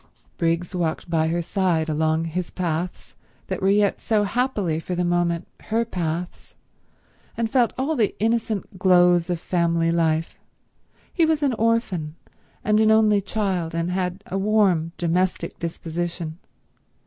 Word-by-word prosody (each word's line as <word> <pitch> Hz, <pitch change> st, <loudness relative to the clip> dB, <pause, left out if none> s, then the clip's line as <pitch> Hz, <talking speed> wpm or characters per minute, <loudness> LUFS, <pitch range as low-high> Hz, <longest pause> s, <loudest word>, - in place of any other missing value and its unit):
Briggs 170 Hz, +1 st, 0 dB
walked 170 Hz, -1 st, -2 dB
by 160 Hz, -1 st, +2 dB
her 170 Hz, +1 st, -1 dB
side 175 Hz, -4 st, 0 dB
along 160 Hz, +1 st, +1 dB
his 170 Hz, +2 st, -3 dB
paths 175 Hz, 0 st, -3 dB, 0.3 s
that -, -, -4 dB
were 190 Hz, -, +3 dB
yet 205 Hz, 0 st, +2 dB
so 215 Hz, -2 st, +2 dB
happily 205 Hz, -8 st, 0 dB
for 180 Hz, +2 st, -4 dB
the 175 Hz, 0 st, 0 dB
moment 175 Hz, -1 st, 0 dB, 0.2 s
her 230 Hz, +2 st, 0 dB
paths, 175 Hz, -4 st, -4 dB, 0.8 s
and 230 Hz, -1 st, -1 dB
felt 250 Hz, -3 st, +3 dB
all 280 Hz, +5 st, 0 dB
the 220 Hz, -7 st, +1 dB
innocent 220 Hz, -3 st, -1 dB
glows 180 Hz, -2 st, +4 dB
of 175 Hz, -2 st, -1 dB
family 170 Hz, -1 st, +1 dB
life. 165 Hz, -1 st, 0 dB, 0.7 s
He 340 Hz, -, +2 dB
was 315 Hz, -2 st, +2 dB
an 275 Hz, -3 st, +2 dB
orphan 220 Hz, -9 st, 0 dB, 0.5 s
and 210 Hz, +1 st, +3 dB
an 220 Hz, 0 st, +4 dB
only 215 Hz, -2 st, +4 dB
child, 190 Hz, -5 st, -2 dB
and 170 Hz, +1 st, -1 dB
had 185 Hz, +1 st, -2 dB
a 195 Hz, -, -3 dB
warm, 195 Hz, -6 st, +2 dB
domestic 175 Hz, 0 st, -1 dB
disposition. 170 Hz, 0 st, -4 dB
180 Hz, 145 wpm, -23 LUFS, 165-210 Hz, 0.8 s, glows